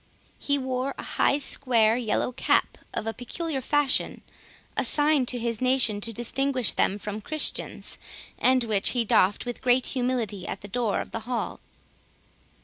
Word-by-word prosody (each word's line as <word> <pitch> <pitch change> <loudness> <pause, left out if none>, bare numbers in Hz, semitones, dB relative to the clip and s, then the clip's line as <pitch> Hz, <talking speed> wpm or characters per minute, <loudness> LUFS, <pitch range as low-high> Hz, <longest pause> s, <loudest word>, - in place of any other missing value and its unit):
He 285 0 +1
wore 260 0 -2
a - - -6
high 280 - +1
square 240 -6 +3
yellow 240 0 -1
cap 250 - +1
of - - -4
a 225 - -2
peculiar 270 +4 -4
fashion, 290 +1 +1 0.5
assigned 295 -3 +2
to 250 - 0
his 230 -1 -2
nation 255 -5 +2
to 230 - -1
distinguish 255 +2 0
them 195 - +1
from 210 +1 -6
Christians, 310 +7 0 0.4
and 255 -1 +3
which 215 -4 +1
he 235 - +2
doffed 200 +1 +2
with 245 -1 -5
great 250 0 +3
humility 245 -7 -2
at - - -5
the 205 - -8
door 225 0 -1
of - - -9
the - - -4
hall. 245 -2 -3
245 Hz, 155 wpm, -26 LUFS, 220-265 Hz, 0.5 s, square